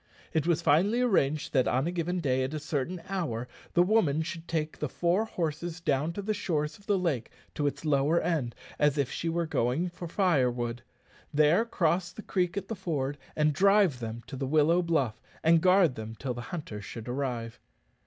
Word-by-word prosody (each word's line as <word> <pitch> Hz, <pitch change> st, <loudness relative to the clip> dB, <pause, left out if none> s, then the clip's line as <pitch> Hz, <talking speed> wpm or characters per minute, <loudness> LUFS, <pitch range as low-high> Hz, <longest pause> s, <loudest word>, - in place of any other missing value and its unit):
It 160 Hz, 0 st, +1 dB
was 170 Hz, -3 st, +2 dB
finally 200 Hz, +10 st, +3 dB
arranged 155 Hz, -, +1 dB
that 130 Hz, -3 st, +3 dB
on 130 Hz, +3 st, +1 dB
a 170 Hz, -, -1 dB
given 175 Hz, +1 st, -1 dB
day, 130 Hz, -3 st, +1 dB
at 135 Hz, +4 st, -3 dB
a -, -, -2 dB
certain 155 Hz, +3 st, -3 dB
hour, 155 Hz, -, -2 dB, 0.3 s
the 175 Hz, -, +6 dB
woman 180 Hz, -7 st, +2 dB
should 170 Hz, 0 st, -6 dB
take 155 Hz, -1 st, -2 dB
the 150 Hz, -, -2 dB
four 175 Hz, +9 st, +1 dB
horses 170 Hz, -3 st, -3 dB
down 155 Hz, -1 st, 0 dB
the 205 Hz, +3 st, -2 dB
shores 150 Hz, -6 st, -2 dB
of 200 Hz, -, -22 dB
the 205 Hz, -2 st, +3 dB
lake 155 Hz, -11 st, -1 dB, 0.2 s
to 145 Hz, -, 0 dB
its 145 Hz, +2 st, -4 dB
lower 150 Hz, +3 st, +3 dB
end, 145 Hz, -9 st, -1 dB, 0.2 s
as 150 Hz, 0 st, +3 dB
if 140 Hz, -3 st, 0 dB
she 165 Hz, -, -2 dB
were 170 Hz, +1 st, 0 dB
going 155 Hz, +3 st, 0 dB
for 175 Hz, 0 st, -8 dB
firewood, 125 Hz, -, +1 dB, 0.5 s
there 155 Hz, +8 st, +4 dB
cross 175 Hz, -4 st, 0 dB
the 215 Hz, -, -9 dB
creek 180 Hz, 0 st, -1 dB
at 195 Hz, -1 st, -3 dB
the 225 Hz, -, -3 dB
ford, 145 Hz, -7 st, -2 dB, 0.2 s
and 150 Hz, -1 st, +2 dB
drive 195 Hz, -5 st, +4 dB
them 115 Hz, 0 st, -5 dB
to 135 Hz, -, -8 dB
the 135 Hz, 0 st, -3 dB
willow 155 Hz, +4 st, +4 dB
bluff, 155 Hz, -10 st, 0 dB, 0.2 s
and 165 Hz, 0 st, +5 dB
guard 185 Hz, -5 st, +5 dB
them 110 Hz, -1 st, -7 dB
till 130 Hz, +1 st, -3 dB
the 120 Hz, -, -6 dB
hunters 145 Hz, -, -6 dB
should 115 Hz, +2 st, -8 dB
arrive. 120 Hz, -3 st, -3 dB
155 Hz, 195 wpm, -29 LUFS, 135-175 Hz, 0.5 s, the